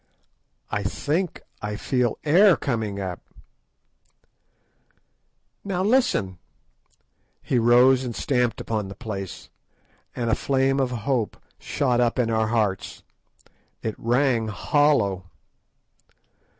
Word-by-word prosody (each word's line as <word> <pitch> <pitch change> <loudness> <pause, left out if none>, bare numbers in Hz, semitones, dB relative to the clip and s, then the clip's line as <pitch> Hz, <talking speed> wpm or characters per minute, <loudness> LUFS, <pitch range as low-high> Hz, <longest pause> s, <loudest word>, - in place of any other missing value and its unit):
"I 105 - -1
think 150 - -2 0.2
I 105 0 -3
feel 125 +1 0
air 175 +4 +5
coming 110 -7 -2
up." 95 -2 -5 2.4
"Now 185 -2 -2
listen." 205 - +1 1.0
He 125 - +1
rose 125 +3 +5
and 120 -3 -5
stamped 125 -4 0
upon 110 -3 -3
the 100 - -9
place, 100 -6 -7 0.6
and 120 -2 -1
a - - +3
flame 135 +1 +1
of 130 -2 +1
hope 125 -1 -2 0.2
shot 125 -4 0
up 120 +1 +1
in 120 -2 +1
our 110 -1 +1
hearts. 110 -4 -1 0.8
_It 110 - -2
rang 120 -1 +1
hollow. 110 -4 +1
120 Hz, 105 wpm, -24 LUFS, 105-135 Hz, 2.4 s, air